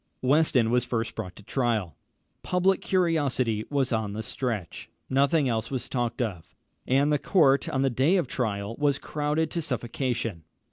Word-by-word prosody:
Weston 130 -4 +3
was 125 0 +3
first 115 -1 -2
brought 95 -6 -6
to 105 - -14
trial. 115 -7 -1 0.5
Public 185 +1 +1
curiosity 145 - +1
was 135 -3 0
on 110 -3 -1
the 110 +1 -4
stretch. 110 -7 -4 0.2
Nothing 140 +2 +3
else 115 -2 -1
was 130 -2 -4
talked 120 -1 -1
of, 95 -8 -6 0.3
and 140 +3 +3
the 145 - +2
court 140 -8 +3
on 135 0 0
the 135 - +2
day 135 +10 +3
of 180 - +2
trial 110 -4 -3
was 145 -2 +2
crowded 150 +2 -1
to 170 - -2
suffocation. 120 - -2
130 Hz, 160 wpm, -27 LUFS, 115-145 Hz, 0.5 s, Weston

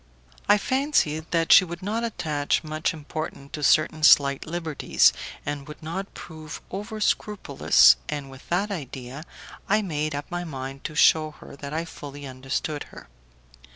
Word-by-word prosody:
I 205 - +7
fancied 210 - 0
that 165 -1 +1
she - - +9
would 175 0 -7
not 220 +4 -2
attach 155 -12 -1
much 155 0 -1
importance 150 -3 -7
to 150 - -6
certain 155 +2 +3
slight 140 -2 +5
liberties, 165 -3 +2 0.3
and 145 -1 -4
would 150 +1 -11
not 190 +5 -5
prove 155 -2 -9
over 210 +3 -5
scrupulous, 190 - +4
and 140 -2 -4
with 135 0 -14
that 195 +4 0
idea 135 -4 -6 0.5
I 215 +2 +3
made 155 -4 -2
up 145 0 -4
my 175 0 -3
mind 135 -4 -7
to 155 - -5
shew 155 +1 +4
her - - -12
that 140 0 -7
I 160 +2 -2
fully 145 -3 -9
understood 135 +3 -4
her. - - -14
155 Hz, 155 wpm, -25 LUFS, 145-175 Hz, 0.5 s, she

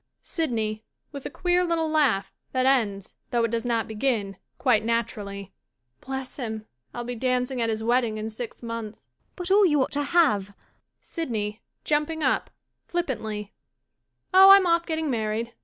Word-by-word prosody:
SYDNEY 220 -9 -2 0.3
[With 280 -2 -6
a - - -6
queer 360 0 +1
little 335 -2 0
laugh 290 -11 +2 0.2
that 255 0 +2
ends, 215 -8 +1 0.2
though 235 -1 +1
it 230 - 0
does 230 +1 -1
not 230 -2 0
begin, 215 -3 -1 0.2
quite 250 -4 +3
naturally.'] 210 -4 -3 0.5
Bless 265 -1 -5
him, 220 -4 -4 0.3
I'll 240 - -5
be 245 +1 -4
dancing 250 +1 -1
at 230 - +1
his 220 0 -2
wedding 235 -2 +1
in 215 +1 -4
six 235 +2 -7
months. 230 -2 -6
MARGARET - - -45
But 360 0 -4
all 410 +1 +6
you 295 -4 +3
ought - - -5
to 290 - 0
have 270 - +2 0.2
— - - -52
SYDNEY 220 -9 -3 0.2
[Jumping 300 +1 0
up, - - +1 0.4
ftippantlyJ] 220 - -3 0.8
Oh, 380 +1 +9
I'm 390 -1 +9
oflF 340 -1 +2
getting 320 -3 -1
married. 225 0 -2
240 Hz, 165 wpm, -25 LUFS, 220-300 Hz, 0.8 s, Oh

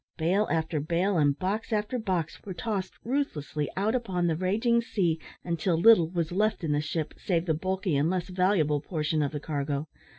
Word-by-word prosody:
Bale 185 +6 +2
after 160 -1 0
bale 170 +5 +1
and 145 -1 +3
box 205 +5 -2
after 215 +4 0
box 185 -7 -2
were 190 -3 -6
tossed 200 -2 -3
ruthlessly 155 - -2
out 205 +4 +1
upon 190 -8 -1
the 165 -2 +2
raging 220 +7 +2
sea 175 -8 0 0.2
until 170 0 0
little 175 -3 +6
was 170 -2 -2
left 210 +1 +1
in 155 - 0
the 145 0 +2
ship, 155 0 -3
save 170 -3 0
the 160 - +2
bulky 185 +1 -1
and 145 +4 +2
less 180 -1 -1
valuable 180 -6 +2
portion 155 -1 -1
of 145 - 0
the 150 - -4
cargo. 145 0 -2
175 Hz, 190 wpm, -28 LUFS, 155-200 Hz, 0.2 s, little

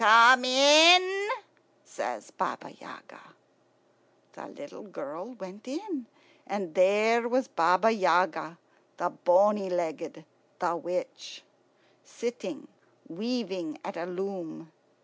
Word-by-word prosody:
"Come 230 +4 +7
in," 340 - +6 0.6
says - - -7
Baba - - -5
Yaga. - - -16 1.1
The - - -12
little 285 +1 -13
girl 255 +4 -9
went 195 0 -13
in, 305 - -7 0.4
and 195 -5 -5
there 215 +5 +2
was 255 +1 0
Baba 185 0 +2
Yaga, 180 -5 0 0.4
the 175 0 -3
bony 195 +2 +2
legged, 165 -2 -5 0.3
the 175 -2 -2
witch, 175 +2 -7 0.6
sitting 285 +5 -7 0.4
weaving 190 -5 -5
at 200 - -7
a 170 +1 -6
loom. 180 -3 -7
205 Hz, 100 wpm, -27 LUFS, 180-255 Hz, 1.1 s, Come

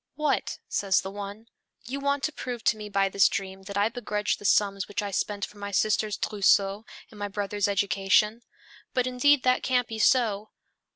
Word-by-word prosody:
"What," 300 -2 -1
says 195 -2 +1
the 190 - -6
one, 205 +2 -7 0.4
"you 265 +4 -4
want 280 0 0
to 310 - 0
prove 245 -6 -6
to - - +3
me 210 -1 -8
by 195 -1 +2
this 195 0 +4
dream 190 -1 -4
that 200 0 -5
I 205 +1 +3
begrudged 220 -2 -2
the 205 - -11
sums 200 -1 +2
which 205 0 -3
I 200 - -4
spent 205 +1 -2
for 205 - -16
my 200 0 -5
sister's 210 +1 +1
trousseau 200 0 +2 0.2
and 210 - -13
my 205 - -2
brother's 205 0 -2
education? 200 +2 +2 0.5
But 250 -1 +2
indeed 255 +2 +3
that 255 0 +3
can't 250 -2 +1
be 225 -1 -6
so. 215 -3 +2
210 Hz, 190 wpm, -27 LUFS, 200-240 Hz, 0.5 s, this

